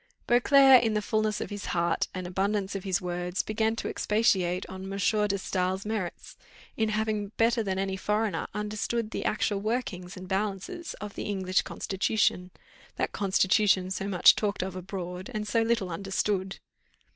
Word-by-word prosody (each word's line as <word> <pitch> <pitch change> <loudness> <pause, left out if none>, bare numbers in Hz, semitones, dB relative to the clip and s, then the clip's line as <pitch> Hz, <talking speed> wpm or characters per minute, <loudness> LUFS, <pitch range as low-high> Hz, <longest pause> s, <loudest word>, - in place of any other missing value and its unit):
Beauclerc 265 +2 +7
in 225 -2 0
the 210 - +1
fulness 215 -1 0
of - - -5
his 205 0 -5
heart, 170 0 +1
and 185 -1 -5
abundance 195 +2 -1
of 195 -2 -4
his 190 0 0
words, 180 0 -2
began 220 +1 0
to - - -4
expatiate 190 -4 +1
on 190 0 -8
M. - - -6
de 195 - -4
Staël's 195 -2 0
merits, 210 -5 -4 0.4
in 220 -1 +1
having 215 -1 -1
better 230 +1 +3
than 190 -3 -2
any 195 0 -1
foreigner 210 +2 -1
understood 215 +2 -2
the - - -3
actual 210 -1 0
workings 200 -5 -3
and 185 0 -8
balances 200 - -3
of 210 0 -8
the 210 - -4
British 190 -1 +1
constitution, 190 -2 0 0.5
that - - -1
constitution 190 -1 +2
so 195 +1 -2
much 185 -3 +6
talked 205 -3 -1
of 185 -1 -5
abroad, 185 0 -6
and 210 0 -2
so 230 +1 +2
little 225 -5 0
understood. 195 +2 -1
200 Hz, 165 wpm, -28 LUFS, 185-215 Hz, 0.5 s, Beauclerc